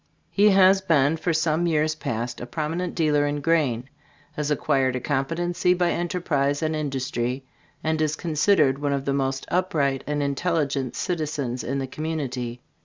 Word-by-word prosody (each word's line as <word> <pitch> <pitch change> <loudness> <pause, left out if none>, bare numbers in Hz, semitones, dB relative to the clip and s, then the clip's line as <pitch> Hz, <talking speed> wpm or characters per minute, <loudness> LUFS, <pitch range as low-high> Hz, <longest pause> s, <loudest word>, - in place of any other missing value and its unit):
He 205 +1 +5
has 195 0 +6
been 155 -4 +3
for 165 +2 -1
some 160 +1 +1
years 155 -1 +2
past 120 -5 -4
a 120 - -6
prominent 165 +6 -3
dealer 150 -3 +2
in 145 0 -2
grain, 140 -6 +1 0.4
has 150 -1 -3
acquired 135 -3 +1
a - - -1
competency 165 +7 0
by 175 -1 +1
enterprise 160 -5 0
and 155 0 0
industry, 135 -3 -2 0.4
and 160 0 0
is 155 0 +1
considered 155 -4 +2
one 145 -1 0
of 140 0 -2
the 140 - 0
most 135 -1 -1
upright 150 -7 +1
and 145 0 -1
intelligent 140 -2 -1
citizens 150 -7 -2
in 135 +3 -2
the 135 - -1
community. 130 -5 -4
150 Hz, 160 wpm, -24 LUFS, 135-165 Hz, 0.4 s, has